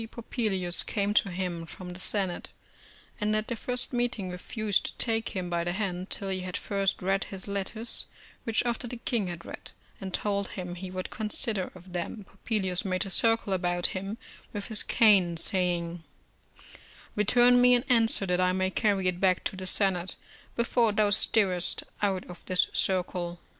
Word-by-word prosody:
Popilius 205 -7 -1
came 205 0 -1
to 205 - +3
him 175 -2 -3
from 180 +2 -9
the 180 - -8
Senate, 190 -2 -2 0.7
and 215 -1 +1
at 215 0 -1
their 235 - -2
first 250 +3 +1
meeting 240 -6 -1
refused 205 +3 0
to - - -6
take 225 -2 +1
him 185 -2 -2
by 170 -1 -1
the 175 0 -2
hand, 185 -2 -3
till 195 - -2
he 190 -1 -1
had 185 -1 -4
first 195 -2 -1
read 195 +1 +1
his 195 0 -5
letters, 200 +3 -1 0.4
which 225 +1 0
after 240 0 -1
the 245 - -6
king 230 -3 -1
had 170 -1 -7
read, - - -8 0.3
and 190 -1 -6
told 200 0 -1
him 180 -1 -5
he 185 +1 -7
would 185 0 -5
consider 215 -3 0
of 180 0 -14
them, 180 +4 -4
Popilius 190 -3 -2
made 185 -1 +1
a 195 - -6
circle 225 0 +3
about 175 -1 0
him 195 +3 -4 0.4
with 205 0 -5
his 220 -2 +4
cane, 195 -7 +4
saying: 175 -2 -1 1.1
"Return 245 +4 +5
me 250 0 +6
an 245 - +1
answer, 225 -5 +4
that 180 -1 +1
I 180 0 +2
may 185 0 0
carry 200 -3 +1
it 180 -1 -1
back 185 -2 +2
to - - -3
the 185 0 -7
Senate, 185 -2 0 0.4
before 235 -1 +2
thou 210 0 +2
stirrest 195 -4 +3 0.2
out 195 -3 0
of 180 -1 -11
this 185 -1 +2
circle." 180 -2 0
195 Hz, 180 wpm, -28 LUFS, 180-215 Hz, 1.1 s, me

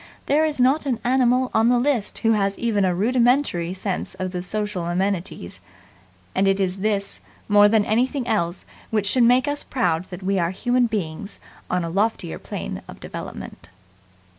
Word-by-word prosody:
There 300 +3 +3
is 300 -3 -2
not 275 +4 +3
an 245 -4 0
animal 255 0 +2
on 225 +2 +4
the 245 - +4
list 240 -4 0
who 225 - +5
has 200 -2 +1
even 220 -4 +1
a 180 -1 +1
rudimentary 235 -4 +2
sense 190 0 -4
of 185 0 -4
the 180 -1 -3
social 205 -2 -3
amenities; 175 - -2 0.7
and 195 +1 +2
it 195 0 +2
is 190 -1 0
this 200 0 -1 0.3
more 205 0 +6
than 215 -1 +3
anything 250 +4 0
else 175 -6 -1 0.2
which 215 -2 0
should 245 +5 +2
make 250 +4 +4
us 290 0 -1
proud 180 -10 0
that 185 0 -9
we 195 0 +1
are 170 -1 +1
human 245 +6 +1
beings 200 -2 -4 0.3
on 180 -1 0
a 165 - -3
loftier 195 - -1
plane - - -6
of - - -11
development. - - -8
205 Hz, 175 wpm, -23 LUFS, 185-245 Hz, 0.7 s, more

